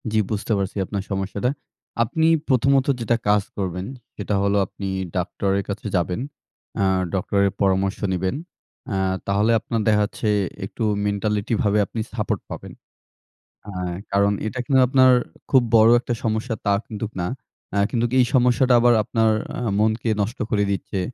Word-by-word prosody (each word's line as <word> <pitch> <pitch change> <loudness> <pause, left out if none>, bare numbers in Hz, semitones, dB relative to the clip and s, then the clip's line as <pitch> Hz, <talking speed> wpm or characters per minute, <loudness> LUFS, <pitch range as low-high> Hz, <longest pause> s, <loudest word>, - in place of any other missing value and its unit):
জি, 110 - +3
বুঝতে 105 +2 -3
পারছি 100 -1 -3
আপনার 100 0 -4
সমস্যাটা। 100 +4 -1 0.5
আপনি 160 +8 +1 0.2
প্রথমত 135 0 +3
যেটা 120 0 +1
কাজ 105 -1 +4
করবেন, 90 -2 -3 0.3
সেটা 105 0 -2
হলো 100 0 +2
আপনি 100 - -7 0.3
ডাক্তারের 95 +2 -1
কাছে 100 +1 -4
যাবেন। 90 +2 0 0.6
আ - - +3 0.3
ডক্টরের 100 +1 +1
পরামর্শ 95 0 +1 0.2
নিবেন। 95 +5 -1 0.6
আ - - -1 0.3
তাহলে 100 +3 +2
আপনার 115 +1 -2
দেখাচ্ছে 105 +1 +1 0.4
একটু 105 - -5 0.2
mentality 105 +1 -1
ভাবে 105 0 +2
আপনি 110 - -6
support 110 -3 -2
পাবেন। - - -8 0.9
অ্যা 100 -3 -7 0.3
কারণ 100 +1 +3 0.2
এটা 125 +4 -5
কিন্তু 130 +1 +4
আপনার 130 0 +5 0.4
খুব 130 -2 +5
বড় 110 0 +7
একটা 120 0 -3
সমস্যা 110 +1 -1
তা 100 - +3
কিন্তুক 110 -1 -5
না। 90 - -1 0.4
অ্যা 100 - 0
কিন্তু 120 -1 0
এই 125 - +5
সমস্যাটা 125 0 +4
আবার 120 0 +5
আপনার 110 +1 +2 0.2
অ্যা 120 - -2
মনকে 110 +2 +1
নষ্ট 110 +5 -3
করে 100 -1 +2
দিচ্ছে। 100 +1 -3
105 Hz, 150 wpm, -22 LUFS, 100-115 Hz, 0.9 s, বড়